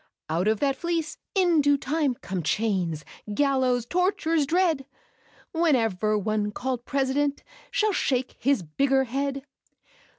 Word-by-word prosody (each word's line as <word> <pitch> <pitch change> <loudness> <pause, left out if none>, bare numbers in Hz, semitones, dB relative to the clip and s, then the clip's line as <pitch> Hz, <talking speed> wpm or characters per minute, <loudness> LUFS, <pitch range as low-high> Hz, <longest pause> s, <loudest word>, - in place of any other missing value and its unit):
Out 170 +5 +1
of 215 -1 +2
that 275 -1 +2
fleece, 335 +1 -2 0.2
in 350 -5 +4
due 285 0 +4
time, 285 -1 0
come 190 -5 -4
Chains, 175 -4 -1 0.3
gallows, 255 -1 +2
tortures 340 -2 +1
dread. 325 -5 +1 0.6
Whenever 225 - +2
one 210 0 -1
called 250 +2 -3
president 280 +1 0 0.3
Shall 430 -1 +1
shake 255 -7 0
his 270 -6 +2
bigger 265 - +2
head. 275 +2 -2
270 Hz, 125 wpm, -26 LUFS, 220-300 Hz, 0.6 s, in